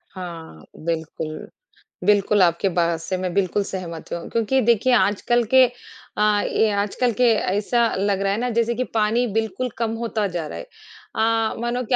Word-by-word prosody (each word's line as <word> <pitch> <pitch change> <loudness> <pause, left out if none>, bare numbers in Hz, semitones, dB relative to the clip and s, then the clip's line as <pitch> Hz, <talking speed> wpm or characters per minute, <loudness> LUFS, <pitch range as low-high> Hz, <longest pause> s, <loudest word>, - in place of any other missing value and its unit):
हाँ, 165 - -8 0.2
बिल्कुल। 160 -1 -4 0.6
बिल्कुल, 205 0 +3
आपकी 170 +2 +2
बात 170 -2 0
से 185 +3 -3
मैं 180 -1 -3
बिल्कुल 200 +1 +1
सहमत 175 -4 -7
हूँ 170 - -5
क्योंकि 230 +3 +1
देखिए 235 +2 +3
आजकल 240 +1 +2
के 260 -1 +8 0.5
अ, 210 -1 +3
ये 220 - +2
आजकल 205 +4 0
के - - +4
ऐसा 210 +4 +1
लग 195 0 0
रहा 195 0 +1
है - - -1
ना 250 +1 -1
जैसे 235 0 +2
कि 255 - 0
पानी 225 +2 +2
बिल्कुल 225 +3 -1
कम 230 -1 -1
होता 225 -2 -2
जा 170 -2 -2
रहा - - -7
है। - - -6 0.5
अ, 225 0 +1
मानो 240 +1 -1
कि 250 - +1
205 Hz, 175 wpm, -22 LUFS, 185-235 Hz, 0.6 s, के